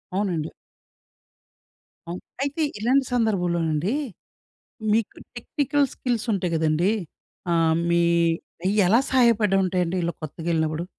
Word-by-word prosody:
అవునండి. 175 -6 -1 1.6
అవున్ 175 +2 -5 0.2
అయితే 285 +3 -2 0.2
ఇలాంటి 260 +4 +2
సందర్భంలోనండి, 180 - 0 1.0
మీకు 225 -1 0 0.2
టెక్నికల్ 285 +3 0
స్కిల్స్ 245 -2 -2
ఉంటాయి 180 -3 -1
గదండీ! 160 +5 +2 0.6
ఆహ్, 165 -1 +3
మీ 170 0 +3 0.6
అయ్యెలా 205 +3 +4
సహాయపడుంటాయండి 195 -7 +2
ఇలా 170 - -1
కొత్తగెళ్ళినప్పుడు? 160 +1 -2
185 Hz, 85 wpm, -24 LUFS, 170-230 Hz, 1.6 s, అయ్యెలా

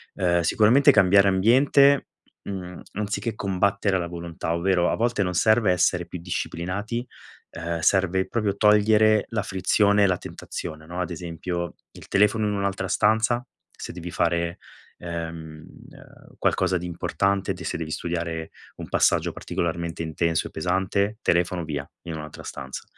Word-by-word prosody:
Uhm, 85 -2 +2
sicuramente 110 +10 +5
cambiare 100 -1 +5
ambiente. 135 +8 +4 0.4
Mhmm, 90 -3 -7
anziché 105 +3 -2
combattere 100 0 +1
la 85 -2 -3
volontà. 85 -1 -4
Ovvero, 90 +1 +2
a - - 0
volte 115 -2 0
non 90 -1 -2
serve 110 +2 +3
essere 90 0 +2
più 90 - -8
disciplinati. 95 +7 -3 0.5
Uhm, 85 0 -4
serve 95 +2 +2
proprio 105 -4 -1
togliere 105 0 +4
la 110 -2 -1
frizione 100 +1 +2
e - - +5
la 90 -1 +1
tentazione, 80 -2 -7
no? 90 +3 -6
Ad 90 - -3
esempio 85 0 -4 0.2
il - - -14
telefono 105 +2 +3
in 105 - -1
un'altra 100 -1 -2
stanza. 110 +2 +2 0.3
Se - - -7
devi 90 0 -7
fare, 85 -1 0 0.4
ehm, 80 -2 -6 0.7
qualcosa 95 0 +1
di 90 - -6
importante, 95 +3 -1
te 90 -2 -9
se - - -2
devi 80 -1 -5
studiare 85 -1 -3 0.2
un - - -8
passaggio - - +2
particolarmente 85 0 -3
intenso 80 0 -1
e - - -13
pesante, 95 +5 0
telefono 85 0 +1
via, 75 -3 -4 0.2
in 85 - -6
un'altra 75 -1 -8
stanza. 65 0 -7
90 Hz, 145 wpm, -24 LUFS, 85-105 Hz, 0.7 s, sicuramente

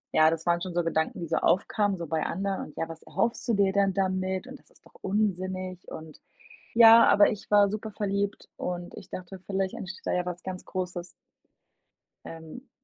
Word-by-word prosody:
ja, 155 0 +6
das 165 +1 -3
waren 170 0 +2
schon 180 -2 -5
so 175 - +2
Gedanken, 160 0 -1
die 170 - -4
so 165 - 0
aufkamen 200 +1 +1
so 170 - -5
bei 160 0 -1
anderen 195 +2 -2
und: 150 - -16
„Ja, 165 - -2
was 165 -1 -9
erhoffst 235 +2 -2
du 230 - +2
dir 195 -1 +2
denn 200 -1 +2
damit?“, 190 +1 -1
und 265 +1 -10
das - - -27
ist - - -25
doch - - -20
unsinnig 185 -2 -2
und 155 -1 -10 0.5
ja, 230 0 +9
aber 205 - +6
ich 210 - -7
war 205 -1 +5
super 215 0 -5
verliebt 200 -1 -2
und 175 -1 -4
ich - - -11
dachte, 185 +1 -8
vielleicht 195 0 -1
entsteht 205 -6 -8
da - - 0
ja 180 0 0
was 180 -1 -5
ganz 185 -1 -6
Großes. 180 -1 -4 1.2
Ähm. 165 - -10
185 Hz, 200 wpm, -27 LUFS, 175-200 Hz, 1.2 s, ja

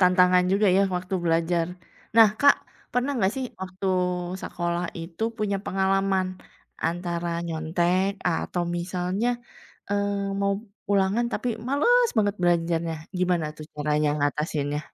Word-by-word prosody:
tantangan 180 0 +5
juga 200 +1 +3
ya, 195 - +5
waktu 180 +1 -3
belajar. 165 0 +2 0.5
Nah, 225 -2 +9
Kak, 285 0 +7 0.4
pernah 250 +3 +1
nggak 195 -1 +2
sih 265 -1 -2 0.2
waktu 190 +1 -5 0.6
sekolah 175 0 -2 0.2
itu 165 +5 -7 0.2
punya 200 -2 0
pengalaman, 195 0 +1 0.6
antara 175 0 -3 0.2
nyontek, 170 +4 +1 0.2
atau 175 +1 -1
misalnya, 180 +5 -1 0.6
eee, 200 -1 -1
mau 200 0 +2 0.4
ulangan 200 +4 +2
tapi 250 - -1 0.2
malas 475 - +4
banget 205 -1 +2
belajarnya. 170 -1 +1 0.2
Gimana 175 -3 +1
tuh 155 - -8
caranya 150 0 +1
ngatasinnya? 145 0 -1
180 Hz, 120 wpm, -25 LUFS, 170-200 Hz, 0.6 s, Nah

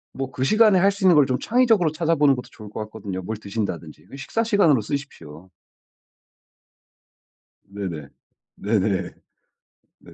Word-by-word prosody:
뭐 135 -1 -4
그 130 - -3
시간에 215 +4 +4
할 200 +2 +4
수 195 0 -8
있는 180 -3 +6
걸 145 -2 +6
좀 130 -1 -1
창의적으로 225 -9 +2
찾아보는 155 -4 +2
것도 125 - -8
좋을 105 -2 -12
것 105 - -8
같거든요. 100 -3 -6
뭘 110 +4 -4
드신다든지, 100 -7 -6
그 - - -13
식사시간으로 200 - +1
쓰십시오. 95 - -7 2.2
네네. 90 -8 -7 0.5
네네. 100 -2 0 1.0
네. - - -17
130 Hz, 300 characters per minute, -22 LUFS, -, 2.2 s, 있는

